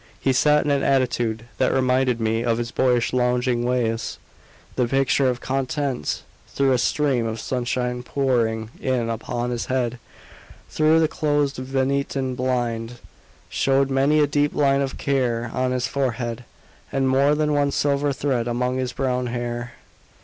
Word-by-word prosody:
He 135 - +1
sat 150 +3 +3
in 145 - +1
an 140 -1 +2
attitude 120 -5 +1 0.2
that - - +3
reminded 130 -2 +2
me 115 +1 0
of 115 -1 +1
his 120 0 -3
boyish 125 -2 +1
lounging 125 -1 +1
ways; 120 -2 -1 0.6
the 125 -2 +1
picture 135 +1 +2
of 125 0 -3
content; 135 - -2 0.3
though 135 -1 +3
a 125 - +3
stream 130 -2 +1
of 110 0 -4
sunshine 125 -1 -2
pouring 115 -4 0
in 125 -3 0
upon 120 +2 -3
his 120 -1 -3
head, 125 -2 -1 0.7
through 155 +1 +4
the 160 - +4
closed 145 -2 0
Venetian 135 0 -1
blind, 120 -2 -2 0.5
showed 135 0 +1
many 140 +3 +3
a 150 - +5
deep 145 +1 0
line 140 -1 +3
of 135 -1 -3
care 120 -4 0
on 130 0 0
his 125 -1 0
forehead, 125 -3 -2 0.5
and 135 -1 +1
more 140 +3 +3
than 150 0 +1
one 145 -1 +2
silver 140 0 +1
thread 130 -4 -1
among 125 +1 -1
his 125 -1 -2
brown 125 -2 -1
hair. 120 0 -4
130 Hz, 155 wpm, -23 LUFS, 120-135 Hz, 0.7 s, a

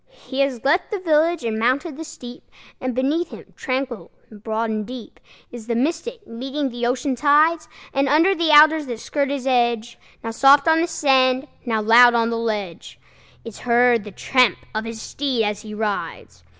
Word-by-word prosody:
He 265 - -5
has 275 -4 -1
left 305 +7 +1
the 420 - -3
village 330 -2 +1
and 220 -1 -2
mounted 265 +7 0
the 320 - -7
steep, 245 -5 -12 0.3
And 255 -2 -3
beneath 295 +7 0
him, - - -13
tranquil 255 -2 -4 0.2
and 210 -1 -15
broad 225 0 -2
and 215 -1 -2
deep, 245 +1 -10 0.3
Is 235 -2 -10
the 235 - -1
Mystic, 340 - -3
meeting 270 +4 -4
the 240 -1 -3
ocean 260 +2 -1
tides; 305 +5 +2 0.3
And 275 0 +1
under 325 +7 +4
the 335 -3 -1
alders 305 0 +6
that 240 -3 -5
skirt 280 +3 -2
its 275 -2 -4
edge, 235 -3 0 0.2
Now 225 - -4
soft 275 +6 +5
on 320 0 +4
the 340 - 0
sand, 265 -3 +1 0.2
now 220 -2 0
loud 240 +2 +6
on 230 0 +1
the 230 - -2
ledge, 210 -7 -5 0.5
Is 230 -3 -9
heard 240 -2 +2
the 210 - -9
tramp 245 0 +1 0.2
of 220 +1 -3
his 225 -1 -7
steed 260 -1 -2
as 210 -1 -2
he 215 -1 -9
rides. 195 - -5
255 Hz, 190 wpm, -21 LUFS, 230-290 Hz, 0.5 s, alders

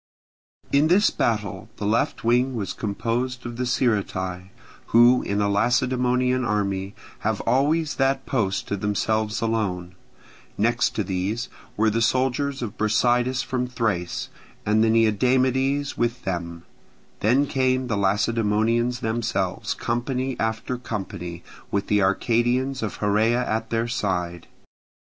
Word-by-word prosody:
In 145 +2 +4
this 190 +5 +4
battle 105 -4 -2
the 105 - -4
left 110 +3 0
wing 125 +3 +2
was 100 -5 -3
composed 120 +4 -2
of 120 0 -6
the 125 0 -1
Sciritae, 95 -7 -1 0.4
who 120 +2 +6
in 100 +1 -2
a 100 - +2
Lacedaemonian 125 +4 +1
army 100 -3 -1 0.2
have 110 -1 -1
always 145 +6 +1
that 135 0 +1
post 105 -8 -1
to 100 - 0
themselves 105 +2 -1
alone; 100 -6 -1 0.6
next - - +1
to - - 0
these 100 +6 -2 0.3
were 110 +1 +3
the 115 +2 0
soldiers 130 +3 +1
of 105 -3 -6
Brasidas 120 +4 +2
from 125 -1 -2
Thrace, 100 -8 -2 0.4
and 110 +1 +3
the 115 - +3
Neodamodes 130 +5 +2
with 120 +1 -1
them; 85 -2 -4 0.6
then 125 +7 +3
came 130 -1 +1
the 115 -4 -1
Lacedaemonians 110 +4 +1
themselves, 110 -5 -1
company 125 +2 -2
after 110 +3 -2
company, 90 -7 -6 0.3
with 100 0 -1
the 105 0 +2
Arcadians 120 +7 +1
of 110 -3 -3
Heraea 110 +4 +2
at 110 +1 -2
their 115 0 0
side. 90 -7 -2
115 Hz, 130 wpm, -24 LUFS, 105-125 Hz, 0.6 s, who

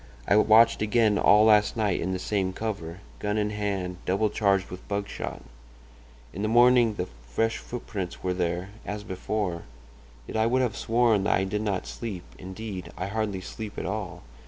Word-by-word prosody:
I - - +4
watched 110 +2 +6
again 105 -1 +3
all 105 +1 +6
last 105 0 +4
night 105 -4 +1
in 90 - -1
the 95 - -1
same 95 0 -1
cover, 95 -5 -5 0.2
gun 105 +1 -1
in 105 0 0
hand, 100 -3 -2
double 100 +3 +1
charged 100 -3 +1
with 90 - -9
buckshot. 100 0 -4 0.9
In 100 - -5
the 105 - 0
morning 120 -1 +5
the 90 - -2 0.2
fresh 115 - 0
footprints 100 -7 -6
were 90 - 0
there, 90 +1 -2
as 105 +1 -5
before. 95 -2 -3 0.6
Yet - - -4
I 110 +1 +3
would 130 +2 +2
have 120 - -1
sworn 115 -4 +2
that - - +3
I 95 - +1
did 105 +2 -2
not 100 -4 -1
sleep—indeed, 95 -1 -7
I 90 - -2
hardly 105 -3 -2
sleep 105 +3 -7
at - - -3
all. 95 -3 -4
105 Hz, 175 wpm, -27 LUFS, 95-110 Hz, 0.9 s, watched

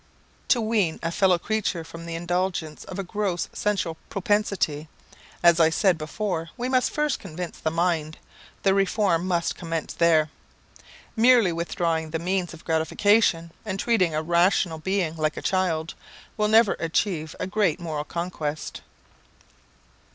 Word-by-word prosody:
To 245 - +4
wean 215 -7 0
a 165 - -1
fellow 185 0 +3
creature 205 -3 -2
from 165 +1 -10
the 165 - -4
indulgence 175 -2 -2
of 185 - -8
a 195 - -2
gross 190 -2 -2
sensual 185 -6 -1
propensity, 195 -7 0 0.5
as 170 -1 +6
I 160 -1 +6
said 180 0 +2
before, 165 +1 -3
we 245 - -2
must 255 -1 +2
first 300 -1 -1
convince 180 -2 -7
the 160 - 0
mind: 165 -2 0 0.5
the 195 - +4
reform 195 -3 +1
must 170 -2 0
commence 165 -3 -4
there. 160 -3 +3 0.8
Merely 235 -4 +5
withdrawing 165 -1 -1
the 160 - -2
means 180 +1 -1
of 165 - -13
gratification, 165 +2 +2
and 190 - -4
treating 185 -10 +2
a 155 - -1
rational 170 0 +2
being 185 -2 -1
like 155 -1 -1
a - - -4
child, 170 -4 0 0.4
will 210 -1 +1
never 220 -1 +5
achieve 165 -1 -1
a - - -1
great 190 -4 +1
moral 155 -4 -3
conquest. 155 -3 -4
175 Hz, 145 wpm, -25 LUFS, 160-200 Hz, 0.8 s, as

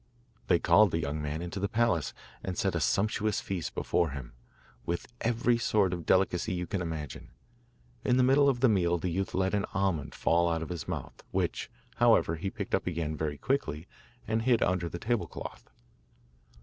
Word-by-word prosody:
They - - +5
called 95 +5 +5
the 80 - -1
young 75 -1 -2
man 75 +3 -3
into 90 +3 -5
the 100 +1 -1
palace, 110 -9 +1 0.3
and 95 -2 -4
set - - +1
a - - 0
sumptuous 110 +1 +1
feast 90 -4 -4
before 85 - +1
him, 65 -4 -7 0.5
with 85 +6 -2 0.2
every 120 +1 +2
sort 100 -5 +2
of 85 -2 -5
delicacy 95 -1 +2
you 90 0 -2
can 100 0 -2
imagine. 80 -5 -5 0.7
In 125 0 +3
the 130 - +5
middle 140 +2 +5
of 120 -3 0
the 130 - +6
meal 90 -5 +2
the 85 +1 -2
youth 95 +3 -2
let 95 +1 +1
an 100 -1 0
almond 90 -7 0
fall 85 +1 +2
out 80 -1 -1
of - - -7
his 85 -3 -5
mouth, - - -5
which, - - -1 0.3
however, 80 - +4
he 95 +5 -2
picked - - -6
up - - +1
again 80 -3 -2
very 75 -1 -2
quickly 90 - -1 0.4
and 110 +1 +1
hid 120 0 +3
under 90 -2 0
the 85 - -5
table 115 +4 -1
cloth. - - -9
90 Hz, 190 wpm, -30 LUFS, 80-110 Hz, 0.7 s, the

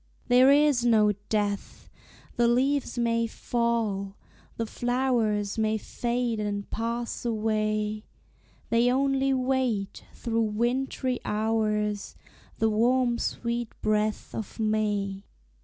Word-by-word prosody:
There 255 +2 +7
is 285 -4 +4
no 220 -3 +4 0.2
death! 205 -2 -2 0.5
the 235 0 +3
leaves 260 +3 +1
may 230 -1 +1
fall. 225 -5 -1 0.4
The 230 - -1
flowers 230 -4 0
may 220 0 +1
fade 235 +1 -2
and 205 -1 -3
pass 235 +1 -3
away 215 -2 -1 0.7
They 235 +2 +4
only 270 +1 +2
wait, 255 -6 0
through 230 -1 -1
wintry 245 +3 -1
hours, 210 -1 -1 0.4
The 225 - +2
warm 240 +2 +2
sweet 235 -1 -3
breath 215 0 0
of 220 +1 -6
May. 205 -2 -1
230 Hz, 105 wpm, -27 LUFS, 215-245 Hz, 0.7 s, There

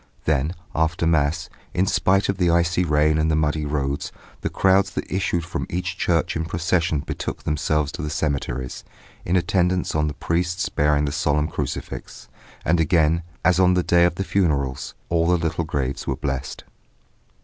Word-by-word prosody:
Then 75 +3 +1 0.2
after 80 +1 0
Mass, 80 +1 +1 0.3
in 90 +2 +3
spite 95 +1 +2
of 100 -1 -1
the 90 -2 +3
icy 85 +1 +2
rain 75 -1 +2
and 80 +1 +2
the 80 - +2
muddy 75 0 0
roads, 70 -1 -2 0.3
the - - -1
crowds 95 0 +3
that 90 - -5
issued 90 -3 0
from 85 - -4
each 90 0 -2
church 85 -3 0
in 80 0 -1
procession 85 -2 0
betook - - -5
themselves 75 -1 0
to 90 - -6
the 75 - -3
cemeteries, 65 -5 -2 0.4
in 90 - +1
attendance 90 0 +1
on 75 0 +1
the 75 - -4
priests 85 +4 -1
bearing 75 0 +2
the 70 - -1
solemn 75 +1 +1
crucifix. - - -5 0.4
And 85 +2 +3
again, 80 0 +3 0.2
as 90 -1 +4
on 90 -1 +5
the 90 - +2
day 85 0 +4
of 85 - +1
the 95 - -2
funerals, 70 -9 0
all 85 0 +2
the 90 0 +4
little 80 0 -1
graves 70 -3 -3
were - - 0
blessed. 65 -2 -4
80 Hz, 175 wpm, -23 LUFS, 75-90 Hz, 0.4 s, on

